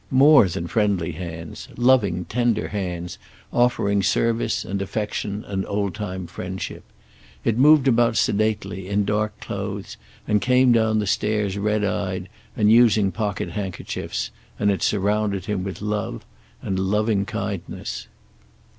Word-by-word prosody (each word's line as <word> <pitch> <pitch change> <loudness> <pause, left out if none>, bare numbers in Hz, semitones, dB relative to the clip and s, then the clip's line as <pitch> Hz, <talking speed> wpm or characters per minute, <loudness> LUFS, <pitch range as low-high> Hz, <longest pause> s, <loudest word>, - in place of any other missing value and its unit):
More 140 -3 +7
than 90 0 -4
friendly 100 -4 0
hands. 80 -1 -7
Loving, 110 -8 +3
tender 120 -2 0
hands, 90 -3 -4 0.3
offering 100 -5 +2
service 115 +4 +1
and 100 +1 -3
affection 105 +1 -3
and 95 -1 -2
old 100 -2 -1
time 95 -3 -5
friendship. 95 +2 -6 0.6
It 115 - +1
moved 145 +2 +6
about 115 -2 +3
sedately, 100 -2 0
in 100 +1 +1
dark 105 +1 -1
clothes, 100 -1 -5 0.3
and 105 -1 +2
came 125 0 +4
down 110 -2 +3
the 105 - 0
stairs 105 0 0
red 105 +1 0
eyed 95 -2 -2 0.3
and 105 -1 +4
using 110 -4 +5
pocket 100 -5 -2
hand 95 0 -3
kerchiefs, - - -4 0.3
and 100 - +2
it 95 - -2
surrounded 100 -1 0
him 100 -3 -2
with 95 +1 -6
love 105 -1 -3 0.4
and 95 -1 -1
loving 105 +1 +1
kindness. 105 -5 -5
105 Hz, 135 wpm, -23 LUFS, 95-110 Hz, 0.6 s, More